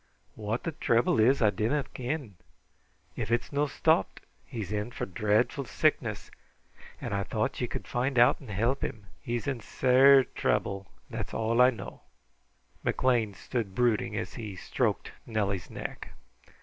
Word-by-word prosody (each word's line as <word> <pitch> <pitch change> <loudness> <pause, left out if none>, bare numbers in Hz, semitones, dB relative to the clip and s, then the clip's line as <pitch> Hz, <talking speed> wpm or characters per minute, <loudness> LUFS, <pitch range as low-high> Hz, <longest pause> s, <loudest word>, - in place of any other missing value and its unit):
What 110 +2 -3
the 165 - -2
trouble 115 -6 +2
is 125 +3 +4
I 105 - +5
dinna 115 +9 0
ken. 130 -3 -4 0.8
If - - -3
it 120 +1 +2
is - - -15
no' 145 +1 +2
stopped, 160 +3 +1 0.2
he's 110 -7 -6
in 105 +2 -2
for - - -4
dreadful 110 +7 +1
sickness, 110 - 0 0.7
and - - -4
I 100 - 0
thought 95 - -2
ye - - 0
could - - -6
find 125 +2 -1
out 120 +1 +6
and 130 - -12
help 115 +7 0
him. 105 -2 -4 0.2
He's 120 -1 -3
in 135 -4 -2
sair 130 +4 +5
trouble; 100 -4 -1 0.2
that's - - -5
all 115 +2 +2
I 125 - +8
know." 125 - -7 0.8
McLean 115 -6 +1
sat 100 -1 -4
brooding 120 -3 +1
as - - -4
he 105 -5 -6
stroked - - -1 0.2
Nellie's 100 -6 -1
neck. - - -6
115 Hz, 155 wpm, -29 LUFS, 105-130 Hz, 0.8 s, I